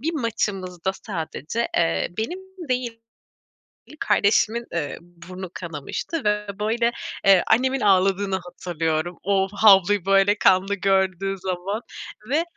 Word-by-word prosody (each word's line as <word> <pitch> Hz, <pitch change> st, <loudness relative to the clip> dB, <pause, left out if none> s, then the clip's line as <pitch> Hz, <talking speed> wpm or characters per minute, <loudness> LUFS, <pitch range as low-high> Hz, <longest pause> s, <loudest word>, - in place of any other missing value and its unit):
bir 325 Hz, +6 st, -1 dB
maçımızda 195 Hz, -, -2 dB
sadece, 190 Hz, +3 st, -4 dB
eee, 80 Hz, 0 st, +1 dB
benim 230 Hz, +12 st, -2 dB, 0.3 s
değil, 245 Hz, -2 st, -2 dB, 1.0 s
kardeşimin, 225 Hz, +3 st, +2 dB
eee, 150 Hz, -4 st, -3 dB
burnu 175 Hz, +2 st, -10 dB
kanamıştı 170 Hz, -, -5 dB
ve, 210 Hz, 0 st, 0 dB
böyle, 230 Hz, +3 st, +1 dB, 0.3 s
eee, 195 Hz, -2 st, +6 dB
annemin 260 Hz, +4 st, +2 dB
ağladığını 195 Hz, 0 st, +2 dB
hatırlıyorum. 175 Hz, -2 st, -3 dB
O 195 Hz, 0 st, +2 dB
havluyu 200 Hz, -2 st, +5 dB
böyle 195 Hz, +1 st, +4 dB
kanlı 195 Hz, +1 st, +3 dB
gördüğü 195 Hz, 0 st, 0 dB
zaman 190 Hz, +3 st, -3 dB, 0.5 s
ve, 305 Hz, +5 st, +2 dB
195 Hz, 110 wpm, -23 LUFS, 180-220 Hz, 1.0 s, eee